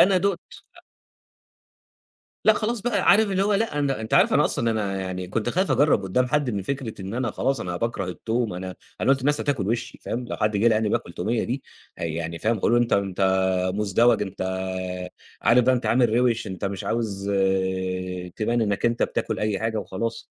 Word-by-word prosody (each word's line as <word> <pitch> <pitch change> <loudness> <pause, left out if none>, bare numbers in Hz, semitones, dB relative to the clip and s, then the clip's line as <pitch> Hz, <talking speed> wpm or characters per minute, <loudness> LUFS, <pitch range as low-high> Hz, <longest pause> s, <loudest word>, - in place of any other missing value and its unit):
أنا 190 +1 +6
دُقت 195 0 +1 0.4
أ 345 - -17 1.6
لأ 220 - +7
خلاص 220 +2 -1
بقى 230 -4 +1
عارف 210 0 +5
اللي 190 0 +1
هو 205 +1 +2
لأ 200 -8 0
أن 140 -1 +1
أنت 110 -4 -2
عارف - - +5
أنا - - +4
أصلًا 115 0 +1
أنا 100 -3 -1
يعني 95 -1 -4
كنت 110 +4 -1
خايف 185 +9 +1
أجرّب 145 -7 +3
قدام 95 +7 +1
حد 145 0 0
من 100 -4 -2
فكرة 130 -2 -4
إن 95 +3 -5
أنا 125 -1 -1
خلاص 135 +3 -1
أنا 90 -1 -3
باكره 115 -1 -2
التوم، 110 +5 -2
أنا 90 +1 -6 0.3
أنا - - +2
قُلت 135 0 +3
الناس 145 +3 +3
هتاكل 125 -9 -1
وشّي، 115 +1 -3
فاهم، 125 +2 -3
لو - - -4
حد 105 -1 0
جه 115 +4 +4
لقاني 110 -1 +2
باكل 85 - -2
تومية 110 +7 -1
دي، 130 +3 -3 0.3
يعني 85 0 -4
فاهم 110 +5 +1
هيقولوا 115 +3 +2
أنت 120 -1 0
أنت 100 -1 0 0.5
مزدوج 105 +3 +3
أنت 95 -2 -5 1.0
عارف 120 +1 +5
ده 130 - +4
أنت 125 -1 -1
عامل 120 -2 +3
روش، 120 -2 +2
أنت 95 -2 -5
مش 100 -1 -3
عاوز 100 -4 -2 1.1
تبان 115 +2 0
إنَّك 100 +1 0
أنت 120 0 0
بتاكل - - -1
أي 105 -2 0
حاجة 110 0 -1
وخلاص، 115 +3 -4
115 Hz, 195 wpm, -24 LUFS, 100-130 Hz, 1.6 s, لأ